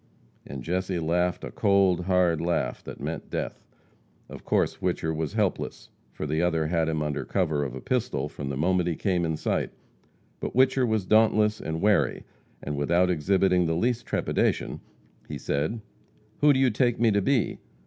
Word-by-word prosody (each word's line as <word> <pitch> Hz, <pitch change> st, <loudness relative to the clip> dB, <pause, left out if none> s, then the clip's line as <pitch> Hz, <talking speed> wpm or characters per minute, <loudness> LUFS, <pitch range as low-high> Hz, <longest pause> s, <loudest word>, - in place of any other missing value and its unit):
And 65 Hz, -2 st, -7 dB
Jesse 90 Hz, +3 st, -1 dB
laughed 85 Hz, +2 st, 0 dB
a -, -, -6 dB
cold, 95 Hz, -3 st, +2 dB
hard 90 Hz, -4 st, +2 dB
laugh 85 Hz, +1 st, -1 dB
that -, -, -8 dB
meant -, -, -5 dB
death. -, -, -4 dB, 0.7 s
Of -, -, -10 dB
course -, -, +1 dB
Whicher 80 Hz, 0 st, -1 dB
was 80 Hz, -2 st, -3 dB
helpless, -, -, -2 dB, 0.2 s
for -, -, -5 dB
the 80 Hz, +2 st, 0 dB
other 80 Hz, -2 st, +1 dB
had 80 Hz, 0 st, +1 dB
him 80 Hz, -1 st, -1 dB
under 75 Hz, -1 st, -2 dB
cover 80 Hz, -7 st, 0 dB
of 65 Hz, -3 st, -5 dB
a 65 Hz, -, -7 dB
pistol 120 Hz, -, -1 dB
from 70 Hz, -1 st, -6 dB
the 70 Hz, -, -3 dB
moment 90 Hz, +3 st, +1 dB
he 85 Hz, -, -1 dB
came 90 Hz, -1 st, 0 dB
in 80 Hz, -1 st, -1 dB
sight. -, -, -1 dB, 0.7 s
But -, -, -4 dB
Whicher 130 Hz, 0 st, +4 dB
was 110 Hz, -4 st, 0 dB
dauntless 110 Hz, 0 st, +3 dB
and 80 Hz, +1 st, -4 dB
wary, 105 Hz, -1 st, +2 dB, 0.4 s
and, 75 Hz, -, -3 dB
without 85 Hz, +5 st, +2 dB
exhibiting 90 Hz, +1 st, +2 dB
the 80 Hz, -, 0 dB
least 120 Hz, +6 st, 0 dB
trepidation, -, -, 0 dB, 0.5 s
he -, -, -4 dB
said: 80 Hz, +11 st, -2 dB, 0.6 s
"Who 150 Hz, 0 st, +6 dB
do 130 Hz, -, +2 dB
you 130 Hz, -2 st, +4 dB
take 120 Hz, +1 st, +1 dB
me 115 Hz, -1 st, +4 dB
to 100 Hz, 0 st, +2 dB
be? 130 Hz, +2 st, +1 dB
90 Hz, 180 wpm, -26 LUFS, 80-105 Hz, 0.7 s, Who